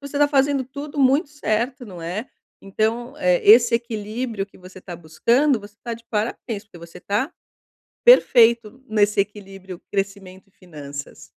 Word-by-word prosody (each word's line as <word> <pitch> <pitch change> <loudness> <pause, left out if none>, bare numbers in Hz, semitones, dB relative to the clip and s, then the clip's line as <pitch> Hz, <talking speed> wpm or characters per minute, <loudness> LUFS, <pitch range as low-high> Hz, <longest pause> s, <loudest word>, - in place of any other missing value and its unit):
você 280 0 -5
tá 290 0 +4
fazendo 275 -1 +2
tudo 285 +3 -8
muito 275 +4 +3
certo, 250 -2 -2
não 180 -5 -10
é? 185 +9 -5 0.3
Então, 225 +6 -2
eh, 180 -1 +2
esse 235 +2 +7
equilíbrio 225 -1 -3
que 200 - -21
você 185 0 -13
tá 180 -1 -9
buscando, 235 - +1
você 205 0 -14
tá 235 - -4
de 230 +1 -15
parabéns, 215 0 -3
porque 210 -4 -17
você 170 +1 -12
tá 215 - -2 0.7
perfeito 235 - +5
nesse 210 -1 +1
equilíbrio 195 -3 -5
crescimento 195 -1 -4
e - - -36
finanças. 145 -7 -10
215 Hz, 155 wpm, -22 LUFS, 195-255 Hz, 0.7 s, esse